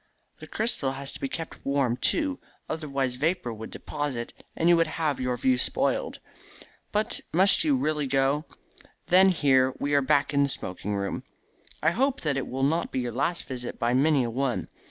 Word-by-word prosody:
The - - -10
crystal 185 - -1
has 135 0 -5
to - - -7
be 135 - -3
kept 165 +2 -6
warm, 140 -4 +1
too, 285 - 0 0.3
otherwise 140 -5 -2
vapour 155 -4 0
would 110 0 -8
deposit, 140 -5 -4 0.2
and 165 - +1
you 175 - +7
would 165 -1 +3
have 155 -3 -1
your 125 -1 -1
view 130 0 +2
spoiled. - - 0 0.7
But 210 +1 0
must 190 - +5
you 300 -3 +3
really 155 - 0
go? 135 +3 +1 0.6
Then 190 +2 +7
here 130 -6 +3
we 145 +1 -1
are 140 - +5
back 140 +1 +2
in 140 - +3
the 140 - +2
smoking 100 -3 -3
room. 100 0 -2 0.6
I 155 - +4
hope 265 +7 0
that 150 -3 0
it 135 - -2
will 135 +1 -3
not 160 +5 +1
be - - -1
your 120 -1 -3
last 170 +8 -1
visit 125 -2 -6
by 120 0 +1
many 140 +1 +3
a 120 - -2
one. 130 +1 -1
140 Hz, 190 wpm, -27 LUFS, 130-165 Hz, 0.7 s, you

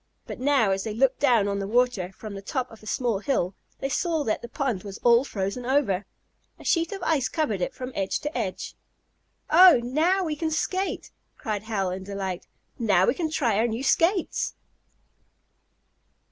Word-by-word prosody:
But - - -7
now 260 -6 +3
as 190 0 -1
they 215 -1 -4
looked 265 +2 +2
down 240 -8 +3
on 200 0 -1
the 195 - -3
water, 230 -5 +1
from 210 +2 -9
the 195 - -7
top 255 +4 -3
of 225 - -14
a 215 - -13
small 235 -3 0
hill, 205 -6 0 0.3
they - - 0
saw 325 +1 0
that 220 - -1
the 235 - -8
pond 260 -10 -2
was 200 0 -8
all 240 +1 +6
frozen 200 -1 -3
over. 240 -7 +1 0.5
A - - -14
sheet 335 -1 +1
of 390 -3 -6
ice 285 -6 +1
covered 260 - -1
it - - -2
from 255 0 -6
edge 195 -1 -1
to 300 +2 -4
edge. - - -3 0.8
"Oh, 355 -3 +8
now 325 +10 +2
we 315 -3 -2
can 320 +1 -2
skate!" 375 +5 -2 0.3
cried 210 -2 -3
Hal 195 -4 -1
in 185 +1 -5
delight, 190 -2 -5 0.3
"Now 205 -6 +3
we - - +3
can 320 +2 -2
try 240 -10 +1
our 230 - +3
new 230 +3 -3
skates." 335 +7 +1
240 Hz, 190 wpm, -26 LUFS, 200-295 Hz, 0.8 s, Oh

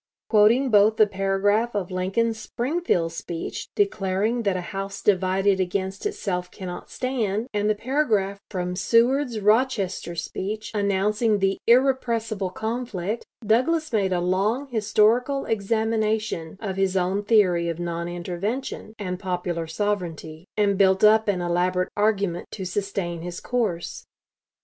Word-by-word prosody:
Quoting 230 +5 +4
both 210 +1 +5
the 215 - +7
paragraph 205 +3 0
of 195 -3 -2
Lincoln's 205 +5 0
Springfield 240 - -1
speech 165 0 -5
declaring 220 - 0
that 200 -4 0
"a - - -3
house 195 0 -4
divided 190 0 +2
against 190 - -2
itself 195 - -3
cannot 180 -1 -8
stand," 235 -4 -2
and 210 0 +1
the 215 - +2
paragraph 215 -5 0
from 180 -2 -3
Seward's 240 +4 +2
Rochester 210 -5 +1
speech, 205 +5 -4
announcing 210 +2 +1
the 195 0 0
"irrepressible 235 -5 +2
conflict," 220 -1 -4 0.2
Douglas 265 +8 +2
made 195 -3 +2
a 180 -1 +1
long 205 +10 0
historical 230 +4 +2
examination 220 -4 -1
of 195 -4 -4
his 195 -1 +1
own 190 +3 0
theory 185 -6 +3
of 165 - -3
"non 170 0 -3
intervention" 195 +7 -4
and 180 -3 -4
"popular 175 -3 -3
sovereignty," 170 -3 -3
and 200 -2 +2
built 190 0 +4
up 220 +1 +6
an 190 -3 +1
elaborate 180 +1 0
argument 200 -4 0
to 190 - -5
sustain 185 -3 -3
his 175 +1 -6
course. 215 -9 -2
200 Hz, 130 wpm, -24 LUFS, 185-225 Hz, 0.2 s, the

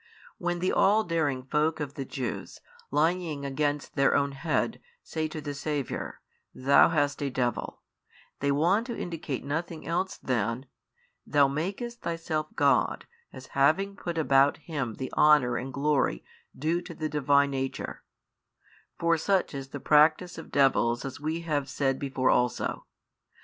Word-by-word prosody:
When 175 0 -1
the 185 +2 0
all 210 +3 +4
daring 155 -8 -1
folk 150 +4 0
of 145 -2 -4
the 135 - -5
Jews, 130 -3 -5 0.3
lying 155 -1 0
against 145 +1 -1
their 140 - +3
own 140 0 +2
head, 150 +3 -1 0.2
say 160 -1 -2
to 155 0 -6
the 145 -1 -4
Saviour, 145 -1 -4 0.3
Thou 135 +2 +5
hast 145 -3 0
a 140 - 0
devil, 125 -2 -2 0.6
they 140 0 +1
want 180 - +2
to 235 - -4
indicate 165 -6 -4
nothing 160 +3 -4
else 180 +3 -1
than, 120 0 -1 0.6
Thou 145 -2 +4
makest 195 - -4
Thyself 165 -2 -2
God, 140 -1 +2 0.3
as 130 0 -10
having 160 +9 +2
put 170 -3 -5
about 140 -2 +4
4 - - -26
Him 125 -6 -1
the 130 - -6
honour 150 -5 +5
and 130 +2 -5
glory 140 - +1 0.3
due 160 +5 0
to 170 -1 -9
the 155 - -2
Divine 140 -1 +3
Nature: 135 -1 -4 1.0
for 170 -1 +2
such 190 +1 +1
is 135 -1 -5
the 145 +1 -7
practice 155 +5 +3
of - - -10
devils 125 -3 +2
as 135 - -6
we 160 +3 -2
have 145 -4 -1
said 135 -1 0
before 135 -2 +1
also. 125 0 0
145 Hz, 155 wpm, -28 LUFS, 135-165 Hz, 1.0 s, Thou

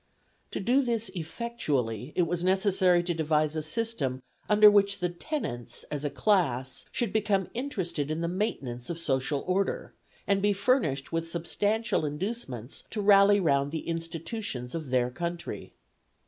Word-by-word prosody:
To - - -4
do 245 +7 +3
this 230 -5 -1
effectually 155 - -2
it 180 - +3
was 170 +1 -1
necessary 185 -2 +3
to 175 0 -1
devise 155 -1 +1
a 155 - -1
system 155 - -2 0.3
under 210 0 +8
which 200 -1 +5
the 180 -2 -1
tenants, 170 - -4
as 145 -1 -3
a 145 - 0
class, 135 - +1
should 235 -5 -1
become 210 -3 +1
interested 185 - -2
in 155 +1 -2
the 170 - 0
maintenance 140 - -3
of 170 - -3
social 140 -2 0
order, 195 - -1 0.3
and 200 -1 +2
be 205 0 +3
furnished 200 - +1
with 165 0 -2
substantial 205 +6 0
inducements 150 - -4
to 215 - -4
rally 200 0 +6
round 140 -5 +2
the 160 - -4
institutions 165 - -4
of 160 -5 -4
their 125 -1 +2
country. 170 +5 -5
175 Hz, 150 wpm, -28 LUFS, 145-205 Hz, 0.3 s, under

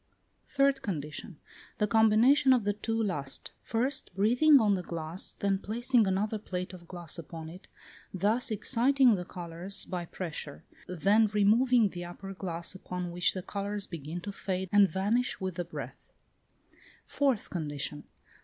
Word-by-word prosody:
Third 275 -1 +2
condition. 155 0 -5 0.4
The 210 - +2
combination 225 +6 +5
of 245 -4 +2
the 205 0 +1
two 225 +2 -2
last; 145 -9 -4
first, 255 +4 -1
breathing 245 +9 +5
on 210 -3 +3
the 185 - 0
glass, 165 0 -4
then 195 -1 0
placing 235 +2 +1
another 210 +3 0
plate 185 -2 -5
of 175 -2 -12
glass 175 -2 -6
upon 160 0 -8
it, 180 +3 -12 0.4
thus 210 +7 +1
exciting 250 +4 +3
the 180 -3 -2
colours 175 +3 -4
by 180 -2 -4
pressure; 160 -5 -6 0.2
then 200 +5 +3
removing 215 +3 +4
the 175 -1 -6
upper 195 +3 -8
glass, 175 -2 -4
upon 180 -1 -5
which 175 +2 +1
the 185 - -4
colours 200 +1 -3
begin 165 +1 -6
to 200 - -5
fade 190 -1 -3
and 205 -2 +6
vanish 210 +8 0
with 185 -1 -3
the 175 +1 -4
breath. - - -9 0.9
Fourth 270 -7 0
condition. 145 -3 -4
195 Hz, 150 wpm, -30 LUFS, 175-225 Hz, 0.9 s, and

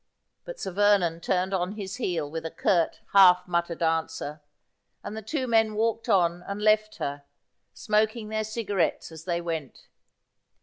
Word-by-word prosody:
But - - -8
Sir 190 - -4
Vernon 195 -4 +3
turned 185 +2 0
on 185 +1 -1
his 200 -1 -6
heel 175 - -2
with 160 +2 -5
a 165 - -3
curt 170 0 0
half 180 -2 +7
muttered 170 -1 -1
answer, 160 -2 -2 0.6
and 215 - -6
the 220 - -5
two 260 +5 -2
men 225 -3 +2
walked 230 +2 -1
on 175 -4 +3
and 200 +1 -4
left 215 0 +2
her, 140 0 -4 0.5
smoking 215 0 0
their 215 0 -1
cigarettes 205 -7 -2
as 160 0 -11
they 175 -2 -1
went. 165 -5 -6
190 Hz, 160 wpm, -26 LUFS, 170-215 Hz, 0.6 s, half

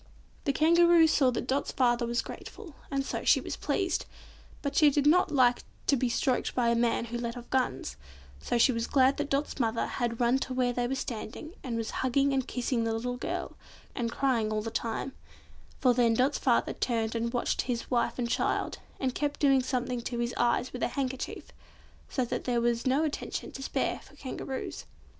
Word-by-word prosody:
The 280 - +3
Kangaroo 340 +3 +5
saw 285 -4 +4
that 240 -1 -2
Dot's 265 +2 -1
father 240 -2 +2
was 235 +1 0
grateful, 395 -8 -9 0.2
and 275 -1 -1
so - - -3
she - - +5
was - - -5
pleased, 380 -3 -1 0.6
but 280 -1 -2
she 305 -2 +7
did 285 0 +1
not 340 +5 +5
like 250 -4 +3 0.2
to 280 - +4
be 255 -1 0
stroked 250 +2 0
by 240 -2 +2
a 235 - +3
man 235 0 +1
who 240 +1 -4
let 235 0 -4
off 240 - -9
guns, 130 - -1 0.4
so 240 - 0
she 235 - +5
was 230 -1 -2
glad 265 0 +4
that 290 -1 -2
Dot's 280 +1 -1
mother 230 -2 +1
had 235 -2 -2
run 245 +2 +3
to 260 -1 -4
where 250 -1 +1
they 245 0 0
were 265 - -1
standing, 260 +5 -5
and 240 -3 -3
was 225 -1 -3
hugging 275 +2 +2
and 265 -1 0
kissing 245 -1 -1
the 225 0 0
little 245 +2 -2
girl, - - -4 0.4
and 235 -2 -2
crying 235 -6 +1
all 215 0 -1
the 225 - -4
time; 230 +3 -2 0.7
for 255 -3 +4
then 235 -2 +3
Dot's 260 +5 +2
father 240 -3 +2
turned 225 -3 -1
and 235 0 -1
watched 245 -1 0
his 245 -1 -3
wife 240 -1 +1
and 245 -2 -1
child, - - -1 0.2
and 260 -2 0
kept 290 +1 -2
doing 275 -2 +4
something 250 -1 -2
to 240 +1 -4
his 235 0 -1
eyes 240 +1 +1
with 250 - -6
a - - +2
handkerchief, 265 -1 -4 0.6
so 255 - 0
that - - -4
there 245 -2 +1
was 235 +1 0
no 270 +4 +3
attention 305 -2 -3
to 270 - -8
spare - - -1
for - - -18
Kangaroos. 265 -1 -5
250 Hz, 205 wpm, -29 LUFS, 235-275 Hz, 0.7 s, she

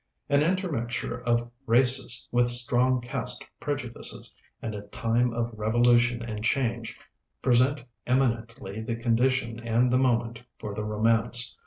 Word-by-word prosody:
An 140 0 +4
intermixture 150 -10 -2
of 120 0 0 0.2
races 125 +1 +3
with 120 0 +3
strong 125 +1 +2
caste 120 - -4
prejudices, 135 -5 -4 0.3
and 110 - -5
a 105 - -5
time 115 +3 0
of 120 0 -3
revolution 120 +2 +2
and 110 -2 -5
change, 115 -4 -1 0.5
present 130 +3 +3 0.2
eminently 115 -3 -1
the 115 +1 -3
condition 115 0 0
and 120 +2 +1
the 125 - +3
moment 120 -3 0 0.2
for 105 - -6
the 105 +1 -4
romance. 115 +3 +1
120 Hz, 130 wpm, -27 LUFS, 115-125 Hz, 0.5 s, An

